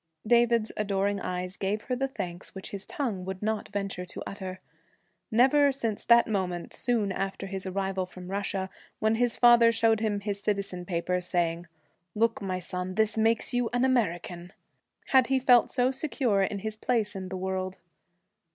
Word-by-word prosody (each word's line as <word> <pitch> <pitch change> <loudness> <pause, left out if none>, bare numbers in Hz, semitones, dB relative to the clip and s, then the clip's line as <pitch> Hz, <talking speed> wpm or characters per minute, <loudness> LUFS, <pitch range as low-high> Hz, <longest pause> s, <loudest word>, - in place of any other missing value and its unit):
David's 235 -1 +3
adoring 200 -1 0
eyes 180 +1 -4
gave 205 +2 -2
her 250 - -2
the 270 +2 -1
thanks 185 -9 -6
which 190 - -7
his 200 -1 -6
tongue 250 - -2
would 190 +1 -6
not 220 0 -1
venture 195 -2 -3
to 180 - -8
utter. 190 -2 -6 0.7
Never 270 +5 +5
since 230 -6 -3
that 235 0 +6
moment, 185 -5 -2
soon 225 -5 0
after 195 +1 -3
his 195 -1 -4
arrival 190 0 -2
from 185 0 -10
Russia, 195 -1 -2 0.3
when 220 0 +2
his 235 +1 +1
father 240 -1 +7
showed 225 -1 +3
him 210 -2 -1
his 200 -1 -3
citizenship 195 -4 -2
papers, 180 0 -1
saying, 170 -1 0 0.5
'Look, 225 +1 +1
my 185 -2 -2
son, 180 0 -4
this 220 0 +2
makes 225 +2 +2
you 245 -2 +1
an 245 +1 +2
American,' 180 -7 -1 0.6
had 260 -2 +5
he 265 - +2
felt 250 -2 +5
so 255 0 +2
secure 260 -7 0
in 195 +1 0
his 215 0 -2
place 220 -3 0
in 190 -1 -5
the 190 - -4
world. 185 0 -3
200 Hz, 170 wpm, -28 LUFS, 185-235 Hz, 0.7 s, father